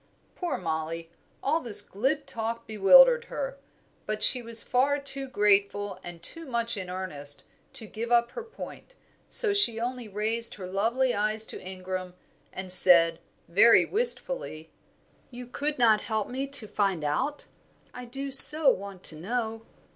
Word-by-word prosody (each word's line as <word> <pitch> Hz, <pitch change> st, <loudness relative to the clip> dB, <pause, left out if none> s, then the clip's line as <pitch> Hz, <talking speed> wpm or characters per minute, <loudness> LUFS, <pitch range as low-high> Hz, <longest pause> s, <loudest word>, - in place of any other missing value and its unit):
Poor 350 Hz, -4 st, -4 dB
Mollie. 165 Hz, -1 st, -5 dB, 0.3 s
All 310 Hz, +4 st, 0 dB
this 210 Hz, -8 st, +4 dB
glib 265 Hz, +10 st, -3 dB
talk 230 Hz, +1 st, -6 dB
bewildered 485 Hz, -, +5 dB
her, -, -, -6 dB, 0.5 s
but 215 Hz, 0 st, -3 dB
she 250 Hz, -, +3 dB
was 230 Hz, -1 st, 0 dB
far 275 Hz, +3 st, 0 dB
too 275 Hz, -1 st, 0 dB
grateful, 205 Hz, -3 st, 0 dB
and 175 Hz, -1 st, -11 dB
too 330 Hz, -, -5 dB
much 235 Hz, -2 st, -2 dB
in 190 Hz, -3 st, -7 dB
earnest, 150 Hz, -6 st, -3 dB, 0.3 s
to 220 Hz, -, -6 dB
give 225 Hz, +3 st, -7 dB
up 235 Hz, 0 st, +2 dB
her -, -, -7 dB
point, 465 Hz, +2 st, -12 dB, 0.3 s
so 450 Hz, -4 st, +6 dB
she 235 Hz, -, +1 dB
only 245 Hz, 0 st, -5 dB
raised 220 Hz, +3 st, -1 dB
her 190 Hz, -, -9 dB
lovely 230 Hz, +7 st, -1 dB
eyes 215 Hz, +1 st, -1 dB
to -, -, -8 dB
Ingram 185 Hz, -1 st, -7 dB, 0.4 s
and 190 Hz, -1 st, -5 dB
said, 170 Hz, -3 st, +6 dB, 0.3 s
very 200 Hz, +7 st, +4 dB
wistfully, 460 Hz, -, -2 dB, 0.6 s
"You 250 Hz, 0 st, -10 dB
could 290 Hz, +4 st, -4 dB
not 225 Hz, -4 st, +3 dB
help 220 Hz, -2 st, -3 dB
me 265 Hz, +2 st, -5 dB
to 265 Hz, -5 st, -1 dB
find 195 Hz, -6 st, -2 dB
out. 150 Hz, -, -3 dB, 0.5 s
I 250 Hz, -, -9 dB
do 275 Hz, +3 st, -7 dB
so 290 Hz, +1 st, +7 dB
want 195 Hz, -1 st, -8 dB
to 160 Hz, -, -3 dB
know." 225 Hz, +5 st, -5 dB
225 Hz, 155 wpm, -26 LUFS, 190-270 Hz, 0.6 s, so